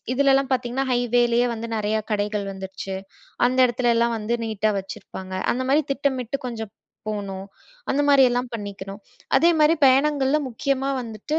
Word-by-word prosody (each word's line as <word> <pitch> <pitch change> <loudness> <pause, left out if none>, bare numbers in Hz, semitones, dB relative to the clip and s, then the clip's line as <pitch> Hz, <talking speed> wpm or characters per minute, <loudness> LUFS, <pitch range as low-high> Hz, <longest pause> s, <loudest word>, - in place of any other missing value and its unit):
இதிலலாம் 275 0 +3
பாத்தீங்கன்னா 255 +1 0
ஹைவேலேயே 240 0 +2
வந்து 230 +1 -5
நெறையா 215 +1 0
கடைகள் 205 0 -1
வந்துருச்சு. 190 0 -6 0.5
அந்த 255 +1 +1
இடத்துலல்லாம் 235 -1 +1
வந்து 220 +3 -2
நீட்டா 215 -1 0
வச்சுருப்பாங்க. 190 0 -8 0.2
அந்தமாரி 260 +5 +1
திட்டமிட்டு 275 -2 -1
கொஞ்சம் 225 -3 -6 0.4
போணும். 195 -2 -4 0.5
அந்த 275 - +1
மாரியெல்லாம் 250 -3 +4
பண்ணிக்கணும். 200 -1 -7 0.4
அதேமாரி 325 -1 +4
பயணங்கள்ல 275 +1 +3
முக்கியமா 270 +2 -1
வந்துட்டு 230 +8 -3
240 Hz, 120 wpm, -23 LUFS, 210-270 Hz, 0.5 s, மாரியெல்லாம்